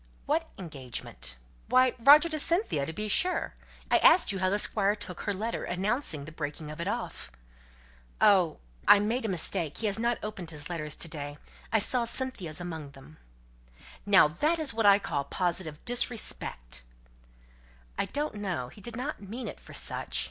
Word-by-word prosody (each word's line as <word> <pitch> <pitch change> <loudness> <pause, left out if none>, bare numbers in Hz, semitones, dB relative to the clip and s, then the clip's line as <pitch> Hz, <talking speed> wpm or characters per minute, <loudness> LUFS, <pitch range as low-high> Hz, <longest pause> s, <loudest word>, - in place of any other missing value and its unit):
"What - - 0
engagement?" 130 - -5 0.3
"Why, 255 0 +4
Roger 290 +7 +8
to 310 -1 -1
Cynthia, 335 - +1
to - - -3
be 210 +6 -4
sure. 360 - +1 0.4
I - - +6
asked 365 - +6
you 195 - -3
how 185 0 +2
the 200 - +1
Squire 205 -1 +2
took 180 -4 -7
her - - -1
letter, 220 +4 -3
announcing 185 - -1
the 155 - -9
breaking 150 0 -6
of 155 - -7
it 170 - -3
off?" 230 - -4 0.9
"Oh 185 -5 +4 0.3
I - - +9
made 225 +5 -1
a - - +1
mistake. 175 -4 0
He 225 - -3
hasn't 225 +3 +1
opened 205 -5 -6
his 150 +1 -7
letters 155 -3 -3
to - - -3
day. 145 -2 -5 0.3
I 225 - +4
saw 235 +3 +2
Cynthia's 230 - 0
among 160 -5 -6
them." 130 - -15 0.9
"Now 200 -6 +6
that 300 - 0
I 225 -9 +4
call 160 -8 -2
positive 170 -2 -1
disrespect." 215 - -2 1.1
"I - - 0
don't 295 +1 -2
know. 185 -12 -3
He 205 - -15
did 235 +2 -6
not 260 +3 -4
mean 220 +6 -6
it - - -7
for - - -14
such. - - -1
195 Hz, 170 wpm, -29 LUFS, 155-235 Hz, 1.1 s, I